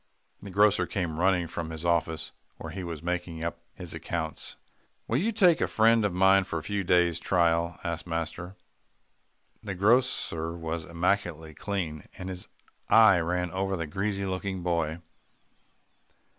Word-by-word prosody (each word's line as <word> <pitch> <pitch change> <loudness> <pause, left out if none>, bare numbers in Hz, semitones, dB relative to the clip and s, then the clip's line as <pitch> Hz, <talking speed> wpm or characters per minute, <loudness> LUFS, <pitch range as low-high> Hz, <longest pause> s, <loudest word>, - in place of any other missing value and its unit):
The 100 - -8
grocer 100 +2 +3
came 85 -5 -3
running 90 -1 +3
from 85 0 -5
his 80 +1 -6
office 85 -1 0 0.3
where 80 - -7
he 95 +2 -5
was 85 -3 -6
making 85 -2 -3
up 85 0 -3 0.2
his 90 -3 -8
accounts. - - -5 0.5
"Will - - +1
you 220 +6 +1
take 185 -6 +4
a - - +2
friend 115 0 +4
of 105 - +1
mine 95 +2 +5
for 85 -3 -4
a 80 - -5
few 100 -1 -2
days' 85 -2 +3
trial?" 85 -1 +1
asked 85 +1 -4
master. 85 +2 -4 1.1
The 100 -3 -5
grocer 100 -6 +1
was 80 -1 -4
immaculately 85 -2 -1
clean, 85 -6 -4
and 90 - -6
his 90 -1 -6 0.4
eye 110 -5 +7
ran 90 +1 -1
over 95 +1 -1
the 85 - -2
greasy 100 +5 -2
looking 95 -1 -3
boy. 85 -2 -1
90 Hz, 155 wpm, -28 LUFS, 85-95 Hz, 1.1 s, eye